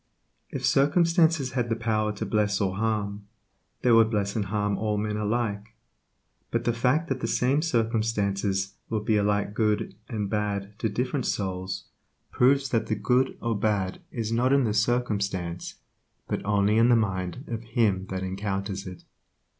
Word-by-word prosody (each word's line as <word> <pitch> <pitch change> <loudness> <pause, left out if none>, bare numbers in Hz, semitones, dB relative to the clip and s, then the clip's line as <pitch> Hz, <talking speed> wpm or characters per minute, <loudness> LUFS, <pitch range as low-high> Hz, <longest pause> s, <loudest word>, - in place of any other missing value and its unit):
If - - -3
circumstances 160 -1 +3
had 125 -2 -1
the 115 - +1
power 110 -2 0
to 105 - -4
bless 105 -2 +1
or 95 -2 0
harm, 105 -2 -2 0.6
they 125 - +4
would 115 -1 +6
bless 100 -2 -1
and 105 -3 0
harm 105 0 0
all 105 -1 -1
men 105 0 -1
alike, 105 0 -2 0.7
but 115 0 -1
the 120 - +1
fact 125 +8 +1
that 135 -1 -1
the - - -2
same 135 +4 +2
circumstances 110 - 0 0.2
will 110 -2 -1
be 110 +1 +1
alike 105 0 +1
good 105 0 0 0.2
and 105 -4 -2
bad 100 -1 -2
to 110 - 0
different 125 +4 -1
souls 95 -1 -3 0.5
proves 135 +2 +3
that 115 -2 0
the 110 - 0
good 130 +3 +1
or 115 -1 0
bad 100 -3 -1
is 115 -2 -3
not 120 +3 +2
in 140 -1 +4
the 110 -3 0
circumstance, 100 -6 -1 0.5
but - - -2
only 105 +1 +2
in 115 +1 +5
the 120 - +6
mind 95 0 -1
of 115 -1 -4
him 110 -5 0
that 95 0 -4
encounters 95 0 -3
it. 90 -1 -9
110 Hz, 165 wpm, -26 LUFS, 100-120 Hz, 0.7 s, would